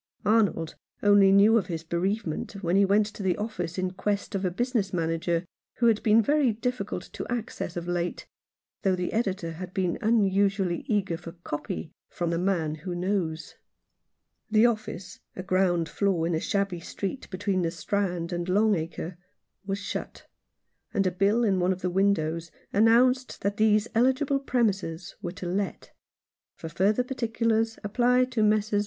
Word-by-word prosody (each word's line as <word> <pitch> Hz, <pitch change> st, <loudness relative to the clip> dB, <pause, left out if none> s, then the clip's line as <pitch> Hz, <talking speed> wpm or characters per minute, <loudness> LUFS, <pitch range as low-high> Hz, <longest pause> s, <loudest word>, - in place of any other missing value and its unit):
Arnold 205 Hz, -7 st, +2 dB, 0.3 s
only 205 Hz, -1 st, +6 dB
knew 210 Hz, +4 st, +6 dB
of 190 Hz, -, -6 dB
his 165 Hz, -3 st, -4 dB
bereavement 175 Hz, +2 st, -2 dB
when 175 Hz, +1 st, +1 dB
he 200 Hz, 0 st, +5 dB
went 205 Hz, +2 st, +3 dB
to 210 Hz, 0 st, -8 dB
the 185 Hz, -2 st, +1 dB
office 185 Hz, -6 st, -4 dB
in 185 Hz, 0 st, -1 dB
quest 200 Hz, +3 st, -2 dB
of 195 Hz, -1 st, -2 dB
a 185 Hz, -, +2 dB
business 225 Hz, +1 st, -1 dB
manager 165 Hz, 0 st, -1 dB, 0.3 s
who 240 Hz, -, 0 dB
had 225 Hz, -2 st, +4 dB
been 220 Hz, +1 st, +4 dB
very 285 Hz, 0 st, +3 dB
difficult 215 Hz, -5 st, -3 dB
of -, -, -3 dB
access 230 Hz, -7 st, -4 dB
of 170 Hz, 0 st, -4 dB
late, 175 Hz, 0 st, -2 dB, 0.6 s
though 190 Hz, -1 st, +2 dB
the 180 Hz, -1 st, -3 dB
editor 190 Hz, -7 st, -1 dB
had 180 Hz, +3 st, -8 dB
been 185 Hz, -3 st, 0 dB
unusually 200 Hz, -4 st, +2 dB
eager 195 Hz, -6 st, 0 dB
for 165 Hz, 0 st, -10 dB
" 175 Hz, -, -31 dB
copy 150 Hz, +1 st, -4 dB
" -, -, -67 dB
from 170 Hz, -1 st, 0 dB
"The 170 Hz, -, 0 dB
Man 175 Hz, -5 st, 0 dB
who 180 Hz, 0 st, -4 dB
Knows." 175 Hz, -3 st, -2 dB, 1.0 s
The 215 Hz, +1 st, +5 dB
office 215 Hz, -5 st, -2 dB
— -, -, -47 dB
a 185 Hz, -, -5 dB
ground 185 Hz, -3 st, +1 dB
floor 185 Hz, -2 st, 0 dB
in 170 Hz, -, 0 dB
a 160 Hz, -, +1 dB
shabby 195 Hz, -1 st, -1 dB
street 195 Hz, +8 st, -5 dB
between 190 Hz, 0 st, -1 dB
the 170 Hz, -, +1 dB
Strand 175 Hz, 0 st, -2 dB
and 175 Hz, +1 st, -3 dB
Long 210 Hz, +3 st, +4 dB
Acre— 165 Hz, 0 st, -4 dB, 0.5 s
was 195 Hz, 0 st, -1 dB
shut, 200 Hz, -, -6 dB, 0.7 s
and 195 Hz, -, +2 dB
a 185 Hz, -, +2 dB
bill 200 Hz, +6 st, +2 dB
in 195 Hz, -4 st, +2 dB
one 180 Hz, +1 st, +2 dB
of 185 Hz, 0 st, -4 dB
the 180 Hz, -, 0 dB
windows 170 Hz, -4 st, +1 dB, 0.2 s
announced 245 Hz, +5 st, +3 dB
that 200 Hz, +1 st, -1 dB
these 215 Hz, 0 st, +3 dB
eligible 265 Hz, +4 st, +2 dB
premises 200 Hz, -10 st, -1 dB
were 175 Hz, -4 st, -4 dB
to 190 Hz, -1 st, -8 dB
let; 190 Hz, +3 st, -3 dB, 0.6 s
for 165 Hz, -, -7 dB
further 200 Hz, +8 st, +2 dB
particulars 230 Hz, -3 st, 0 dB
apply 245 Hz, +4 st, +3 dB
to 250 Hz, -3 st, -2 dB
Messrs. 215 Hz, -1 st, +2 dB
195 Hz, 175 wpm, -27 LUFS, 175-215 Hz, 1.0 s, only